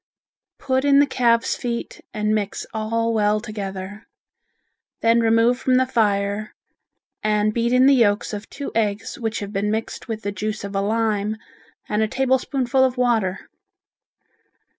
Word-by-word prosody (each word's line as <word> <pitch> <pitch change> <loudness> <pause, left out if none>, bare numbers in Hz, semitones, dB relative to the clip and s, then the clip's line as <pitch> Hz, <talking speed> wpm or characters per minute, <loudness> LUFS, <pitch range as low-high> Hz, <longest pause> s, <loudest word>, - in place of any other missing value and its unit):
Put 260 -1 0
in 280 -1 +4
the 285 - +6
calves' 235 -4 +2
feet 235 -1 -5
and 210 0 -1
mix 205 -2 -2
all 230 +1 -1
well 210 -1 +2
together. 205 -1 -7 1.0
Then 230 +1 +4
remove 230 +2 +3
from 255 -1 +2
the 260 0 +4
fire 205 -3 0 0.7
and 215 0 +1
beat 235 +1 0
in 250 +1 +5
the 275 - +6
yolks 215 -5 +2
of 210 0 -6
two 280 0 -6
eggs 210 -1 -1
which 225 -2 -2
have 205 0 -6
been 200 +2 0
mixed 220 +1 -3
with 220 -2 -5
the 200 - -2
juice 215 +2 -4
of 200 0 -6
a 195 - +1
lime 215 0 0 0.5
and 210 +1 0
a 220 - +2
tablespoonful 260 +1 +1
of 260 -1 +1
water. 225 -7 +1
220 Hz, 155 wpm, -22 LUFS, 210-245 Hz, 1.0 s, the